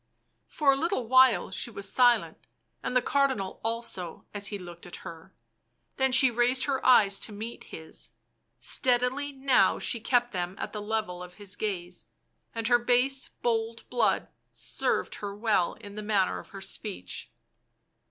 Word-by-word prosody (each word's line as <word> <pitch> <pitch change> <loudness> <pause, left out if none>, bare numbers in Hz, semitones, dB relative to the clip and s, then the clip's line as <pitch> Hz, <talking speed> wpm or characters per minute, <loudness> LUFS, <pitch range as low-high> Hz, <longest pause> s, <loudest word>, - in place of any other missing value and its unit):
For 290 -3 +3
a - - +3
little 320 -2 -1
while 255 -3 +5
she 185 - -1
was 200 -3 -5
silent, 245 -2 +3 0.3
and - - -3
the 250 - +2
Cardinal 265 -10 0
also 225 -7 -3
as 205 -1 -1
he 205 - -4
looked 175 -2 -11
at 175 - -8
her, 170 +1 -10 0.7
then 265 0 +2
she 260 0 +6
raised 245 +2 +2
her 275 -2 -1
eyes 200 -6 +5
to - - -1
meet 220 +3 -7
his; 160 0 -8 0.5
steadily 250 - +1
now 270 -1 +3
she 235 - -1
kept 240 +1 +1
them 180 -1 -3
at - - -5
the 210 - -4
level 210 -4 -2
of 180 0 -10
his 205 -1 -4
gaze, 180 -4 -3 0.5
and 225 -1 -1
her 240 0 +5
base 250 +3 +2 0.2
bold 230 -1 -1
blood 240 -3 +1 0.2
served - - -1
her 200 -1 -4
well 210 -5 +1
in 205 -2 -11
the 210 - -6
manner 205 -3 +1
of - - -13
her 195 - -9
speech. 205 +1 -5
225 Hz, 160 wpm, -28 LUFS, 195-250 Hz, 0.7 s, she